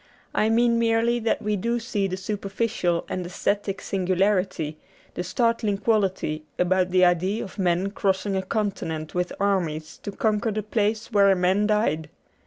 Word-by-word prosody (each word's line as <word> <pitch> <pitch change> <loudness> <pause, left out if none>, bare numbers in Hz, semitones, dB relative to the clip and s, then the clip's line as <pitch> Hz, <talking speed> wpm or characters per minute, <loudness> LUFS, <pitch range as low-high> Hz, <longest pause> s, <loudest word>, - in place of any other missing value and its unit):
I 215 - +2
mean 235 +1 +3
merely 230 +1 +2
that 225 -1 0
we 210 0 0
do 235 +5 -1
see 210 -4 -1
the 185 0 -4
superficial 195 -2 -1
and 185 - -3
aesthetic 200 +3 -2
singularity, 185 -4 0 0.4
the 180 - -3
startling 215 +1 0
quality, 195 -7 0
about 185 +1 +2
the 185 0 +5
idea 185 +5 +1
of 200 +1 -10
men 185 +1 +1
crossing 195 0 0
a 190 - +1
continent 185 -6 -3
with 180 0 -1
armies 170 -6 -1
to 205 - -5
conquer 215 +1 0
the 215 0 -2
place 215 +1 -1
where 200 -2 +5
a 195 - +5
man 190 +3 +2
died. 185 -8 +1
195 Hz, 160 wpm, -25 LUFS, 180-215 Hz, 0.4 s, the